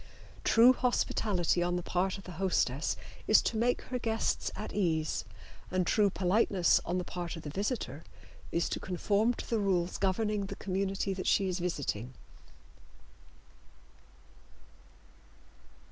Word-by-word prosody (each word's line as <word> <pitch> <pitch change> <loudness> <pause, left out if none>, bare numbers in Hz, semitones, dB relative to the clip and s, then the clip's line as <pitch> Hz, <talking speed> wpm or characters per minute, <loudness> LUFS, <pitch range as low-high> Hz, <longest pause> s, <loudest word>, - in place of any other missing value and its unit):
True 235 +3 +6
hospitality 210 -8 +1
on 175 0 0
the 180 - -2
part 185 +3 0
of 195 - -11
the 185 - -9
hostess 150 -7 +1 0.3
is - - +7
to - - -1
make 240 +3 +1
her 250 -1 -4
guests 225 -1 0
at 215 - -6
ease, 160 -6 0 0.4
and 185 0 0
true 205 +3 +3
politeness 190 -1 +2
on 175 - 0
the 180 - -1
part 175 -1 -5
of 165 - -9
the 145 - -6
visitor 200 - -3 0.5
is 170 - +1
to - - -2
conform 205 +6 +1
to - - -7
the 230 - 0
rules 185 -3 0
governing 200 +1 0
the - - -6
community 195 0 -2
that 185 0 -4
she 195 - +3
is 185 0 -2
visiting. 135 -8 -3
190 Hz, 140 wpm, -31 LUFS, 175-210 Hz, 0.5 s, is